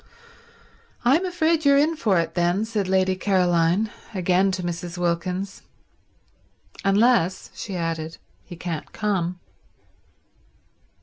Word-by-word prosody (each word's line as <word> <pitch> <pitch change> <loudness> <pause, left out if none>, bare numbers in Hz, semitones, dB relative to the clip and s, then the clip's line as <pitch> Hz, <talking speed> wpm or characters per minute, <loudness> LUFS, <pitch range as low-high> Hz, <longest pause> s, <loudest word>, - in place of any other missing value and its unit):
"I'm 310 +10 +4
afraid 330 -2 +1
you're 280 -1 +5
in 310 +3 +3
for 210 - +2
it, 165 - -2
then," 175 +4 +1
said 215 -4 -2
Lady 190 0 +2
Caroline, 185 +1 +2 0.2
again 185 +1 +2
to 185 -1 -3
Mrs. 175 0 -4
Wilkins. 180 +3 -2 1.2
"Unless," 195 -2 +2
she 195 - -6
added, 165 -2 -3 0.3
"he 175 - -10
can't 165 -2 -5
come." 185 -5 -1
185 Hz, 110 wpm, -24 LUFS, 175-215 Hz, 1.2 s, you're